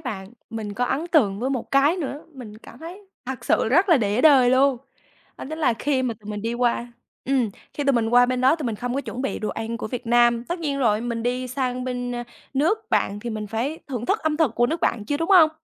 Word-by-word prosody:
bạn. 210 Hz, -7 st, -6 dB, 0.2 s
Mình 215 Hz, -2 st, -5 dB
có 245 Hz, -, 0 dB
ấn 295 Hz, +7 st, -2 dB
tượng 215 Hz, -, +2 dB
với 260 Hz, -, -1 dB
một 260 Hz, -3 st, -3 dB
cái 285 Hz, +6 st, +4 dB
nữa, 290 Hz, -3 st, -5 dB
mình 215 Hz, -5 st, -10 dB
cảm 235 Hz, -, -14 dB
thấy 345 Hz, +5 st, -9 dB, 0.3 s
thật 265 Hz, -1 st, -5 dB
sự -, -, +2 dB
rất 355 Hz, -, +3 dB
là 335 Hz, -, +6 dB
để 210 Hz, 0 st, 0 dB
đời 265 Hz, -5 st, +6 dB
luôn 265 Hz, 0 st, +4 dB, 0.6 s
đó -, -, -6 dB
chính 315 Hz, -, -5 dB
là 310 Hz, -, +2 dB
khi 265 Hz, +1 st, 0 dB
mà 240 Hz, -3 st, -1 dB
tụi 210 Hz, +1 st, -9 dB
mình 210 Hz, 0 st, -5 dB
đi 230 Hz, +1 st, -2 dB
qua 240 Hz, 0 st, 0 dB, 0.3 s
ừm, 255 Hz, -5 st, +1 dB, 0.2 s
khi 290 Hz, -, -3 dB
tụi 275 Hz, -, +3 dB
mình 230 Hz, -2 st, +1 dB
qua 245 Hz, +1 st, +5 dB
bên 255 Hz, 0 st, -1 dB
đó 265 Hz, +6 st, +4 dB
tụi 295 Hz, -6 st, -4 dB
mình 225 Hz, -, -2 dB
không 245 Hz, +3 st, -3 dB
có 275 Hz, -, 0 dB
chuẩn 250 Hz, -1 st, -6 dB
bị 270 Hz, -, -2 dB
đồ 215 Hz, -, -3 dB
ăn 225 Hz, +1 st, -4 dB
của 235 Hz, -, -5 dB
Việt 240 Hz, +2 st, -6 dB
Nam, 240 Hz, 0 st, +3 dB
tất 345 Hz, +6 st, -4 dB
nhiên 285 Hz, -4 st, -2 dB
rồi 215 Hz, -5 st, +2 dB
mình 235 Hz, -1 st, -3 dB
đi 250 Hz, +1 st, -2 dB
sang 255 Hz, -1 st, -2 dB
bên, 245 Hz, -1 st, -3 dB
ơ, 240 Hz, 0 st, -4 dB, 0.3 s
nước 420 Hz, -, 0 dB
bạn 205 Hz, +1 st, 0 dB
thì 235 Hz, -, -5 dB
mình 215 Hz, -1 st, -4 dB
phải 240 Hz, +9 st, -3 dB
thưởng 245 Hz, -3 st, -4 dB
thức -, -, +2 dB
âm 310 Hz, -1 st, 0 dB
thực 300 Hz, -8 st, +1 dB
của 240 Hz, 0 st, +3 dB
nước 325 Hz, +4 st, -2 dB
bạn 210 Hz, -3 st, 0 dB
chứ, 290 Hz, -, -1 dB
đúng 330 Hz, +3 st, -2 dB
không? 350 Hz, -6 st, +7 dB
250 Hz, 265 wpm, -23 LUFS, 230-280 Hz, 0.6 s, không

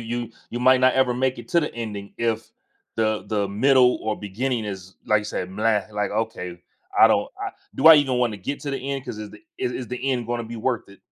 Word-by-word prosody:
you 120 Hz, 0 st, -4 dB, 0.2 s
you 120 Hz, -, -3 dB
might 130 Hz, +1 st, +5 dB
not 130 Hz, 0 st, +5 dB
ever 130 Hz, -2 st, +3 dB
make 130 Hz, 0 st, 0 dB
it 120 Hz, -1 st, -10 dB
to 170 Hz, -, +3 dB
the 150 Hz, -, -3 dB
ending 105 Hz, -4 st, -6 dB
if 115 Hz, -1 st, -1 dB, 0.5 s
the 110 Hz, -1 st, 0 dB
the 105 Hz, -2 st, 0 dB
middle 125 Hz, +5 st, +4 dB
or 110 Hz, -1 st, -2 dB
beginning 115 Hz, +3 st, -2 dB
is, 95 Hz, -2 st, -7 dB
like 105 Hz, -1 st, +3 dB
you 105 Hz, -, -9 dB
said, 90 Hz, -3 st, -4 dB
"bleh," 105 Hz, +1 st, 0 dB
like, 105 Hz, 0 st, -1 dB
okay, 95 Hz, -5 st, -3 dB, 0.4 s
I -, -, +9 dB
don't, -, -, +2 dB, 0.2 s
uh -, -, -3 dB, 0.2 s
"Do 140 Hz, -, +1 dB
I 160 Hz, -, +12 dB
even 135 Hz, -3 st, +2 dB
wanna 120 Hz, -4 st, +1 dB
get 140 Hz, +9 st, -4 dB
to 145 Hz, -, -4 dB
the 135 Hz, -, -2 dB
end 135 Hz, -1 st, -4 dB
'cause 105 Hz, -, -6 dB
is 105 Hz, -1 st, -7 dB
the -, -, -14 dB, 0.2 s
is 380 Hz, -1 st, -1 dB
is 125 Hz, -, -5 dB
the 125 Hz, -, -4 dB
end 120 Hz, -3 st, -1 dB
gonna 120 Hz, -1 st, -2 dB
be 115 Hz, +1 st, -7 dB
worth 115 Hz, -1 st, -2 dB
it?" 100 Hz, -, -17 dB
115 Hz, 240 wpm, -24 LUFS, 105-130 Hz, 0.5 s, I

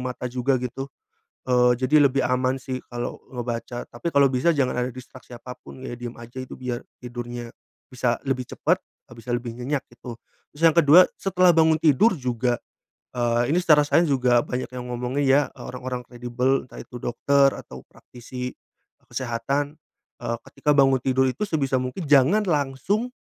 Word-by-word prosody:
mata 125 Hz, 0 st, -4 dB
juga 130 Hz, +2 st, 0 dB
gitu. 135 Hz, +2 st, -5 dB, 0.6 s
Eee, 125 Hz, -1 st, +4 dB
jadi 150 Hz, +2 st, +5 dB
lebih 135 Hz, +1 st, 0 dB
aman 130 Hz, +1 st, +1 dB
sih 130 Hz, 0 st, -5 dB
kalau 120 Hz, 0 st, -5 dB
ngebaca. 120 Hz, 0 st, -4 dB
Tapi 120 Hz, +8 st, -5 dB
kalau 140 Hz, 0 st, +5 dB
bisa 130 Hz, +7 st, +2 dB
jangan 130 Hz, -3 st, +1 dB
ada 125 Hz, +1 st, -1 dB
distraksi 130 Hz, 0 st, -13 dB
apa 125 Hz, +1 st, -9 dB
pun 130 Hz, -, -12 dB
ya, -, -, -5 dB
diem 120 Hz, 0 st, -7 dB
aja 120 Hz, +2 st, -9 dB
itu 130 Hz, -, -9 dB
biar 125 Hz, -2 st, -4 dB, 0.2 s
tidurnya, 120 Hz, -1 st, -7 dB, 0.4 s
bisa 120 Hz, -2 st, -1 dB
lebih 130 Hz, -2 st, -1 dB
cepat, -, -, 0 dB, 0.3 s
eee, -, -, -11 dB
bisa 115 Hz, +1 st, -9 dB
lebih 120 Hz, -1 st, -6 dB
nyenyak 135 Hz, +3 st, -2 dB
gitu. 120 Hz, -1 st, -9 dB, 0.4 s
Terus 150 Hz, -, -12 dB
yang 165 Hz, -, +7 dB
kedua 170 Hz, +3 st, +8 dB, 0.2 s
setelah 185 Hz, -2 st, +4 dB
bangun 160 Hz, -1 st, +4 dB
tidur 165 Hz, -, +4 dB
juga, 125 Hz, -2 st, -1 dB, 0.6 s
eee, 120 Hz, 0 st, +1 dB
ini 175 Hz, -, +3 dB
secara 150 Hz, -4 st, +5 dB
sains 170 Hz, +3 st, +3 dB
juga 125 Hz, -3 st, +3 dB
banyak 125 Hz, +1 st, -4 dB
yang 125 Hz, -1 st, -7 dB
ngomongin 125 Hz, +4 st, -2 dB
ya, 135 Hz, +2 st, +5 dB
eee, -, -, -12 dB
orang-orang 125 Hz, 0 st, -5 dB
kredibel 125 Hz, +2 st, -1 dB
entah -, -, -13 dB
itu 125 Hz, -, -10 dB
dokter 140 Hz, +3 st, +3 dB
atau 65 Hz, 0 st, -10 dB
praktisi 125 Hz, +1 st, -8 dB, 0.6 s
kesehatan, 135 Hz, +4 st, -2 dB, 0.5 s
eee, 115 Hz, 0 st, -2 dB
ketika 150 Hz, -, -1 dB
bangun 135 Hz, -1 st, +5 dB
tidur 130 Hz, 0 st, +2 dB
itu 130 Hz, -, -6 dB
sebisa 135 Hz, -6 st, 0 dB
mungkin 125 Hz, +8 st, -4 dB
jangan 150 Hz, +10 st, +5 dB
langsung, 155 Hz, -, 0 dB
130 Hz, 170 wpm, -24 LUFS, 120-140 Hz, 0.6 s, kedua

